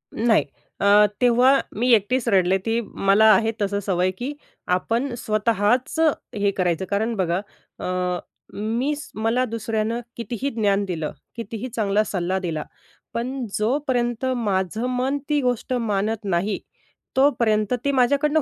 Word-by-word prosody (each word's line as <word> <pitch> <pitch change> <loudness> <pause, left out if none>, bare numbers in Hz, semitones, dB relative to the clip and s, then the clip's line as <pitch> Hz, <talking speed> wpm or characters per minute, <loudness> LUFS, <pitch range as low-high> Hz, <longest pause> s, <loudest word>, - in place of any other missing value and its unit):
नाही 220 -9 +3 0.3
अ, - - 0 0.4
तेव्हा 245 +1 +5 0.3
मी 240 +5 +1
एकटीच 230 +4 +2
रडले. 190 -2 +3
ती 225 +4 -1 0.3
मला 200 +3 +5
आहे, 225 -1 +2
तसं 200 0 0
सवय 185 -1 +1
की 260 +4 -4 0.4
आपण 235 +8 -1
स्वतःच 220 - +1 0.3
हे 200 -2 +1
करायचं 180 -1 0
कारण 220 +3 0
बघा, 175 0 0 0.4
अ, 180 -1 -1 0.3
मी 230 +7 -1 0.2
मला 225 +4 +1
दुसऱ्यानं 225 0 -2 0.2
कितीही 235 +4 -3
ज्ञान 205 -2 +2
दिलं, 165 -5 -3 0.2
कितीही 230 +1 -5
चांगला 210 -1 +2
सल्ला 185 -2 -1
दिला, 165 -5 -3 0.5
पण 255 +2 -3
जोपर्यंत 245 0 0 0.2
माझं 190 +3 -1
मन 265 +3 0
ती 295 -1 +2
गोष्ट 250 0 -1
मानत 220 -2 -1
नाही 195 +2 0 0.6
तोपर्यंत 235 -5 +2
ती 280 - +3
माझ्याकडनं 285 +4 +3
220 Hz, 130 wpm, -23 LUFS, 195-245 Hz, 0.6 s, तेव्हा